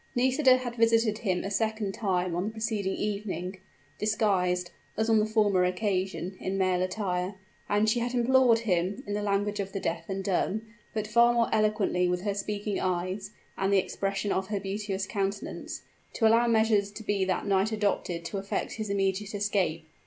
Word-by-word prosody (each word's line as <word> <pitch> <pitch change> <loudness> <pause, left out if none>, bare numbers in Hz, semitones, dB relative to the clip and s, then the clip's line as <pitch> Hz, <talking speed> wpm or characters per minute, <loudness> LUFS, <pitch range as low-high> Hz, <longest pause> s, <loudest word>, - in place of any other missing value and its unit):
Nisida 260 +1 +4
had 245 -1 -5
visited 225 -1 +3
him 185 -5 -1
a 195 - -4
second 220 0 0
time 185 -5 0
on 180 +2 -1
the - - -1
preceding 220 -3 -2
evening 195 -3 -3 0.4
disguised, 185 -5 +1 0.3
as 220 +1 +1
on 220 - +5
the 215 - +1
former 210 -4 +3
occasion, 185 -1 -1
in 190 +1 -2
male 185 -1 +2
attire; 185 0 -2 0.3
and 210 +1 +3
she 225 +3 +2
had 245 +1 -2
implored 245 -1 +5
him, 190 +3 0
in 205 - -4
the 210 - -1
language 205 0 0
of 195 -1 -3
the 195 - -2
deaf 165 -1 -3
and 195 0 -3
dumb, 200 +3 0 0.3
but 215 -1 -2
far 235 +3 +5
more 235 -1 +2
eloquently 210 -4 +2
with 180 0 0
her 205 +1 -1
speaking 205 0 -3
eyes 185 +2 -2 0.3
and 195 0 +1
the 200 - +5
expression 195 +1 -1
of 190 0 0
her 205 -1 -2
beauteous 195 0 -3
countenance, 200 0 -4 0.3
to 225 - +1
allow 230 +2 +4
measures 220 -3 +3
to 215 +2 -9
be 205 -2 0
that 185 -1 -1
night 200 +1 +2
adopted 200 -5 -1
to 195 +3 -3
effect 195 +1 -3
his 215 -2 -4
immediate 195 +1 -1
escape. 190 -6 0
200 Hz, 180 wpm, -28 LUFS, 190-220 Hz, 0.4 s, on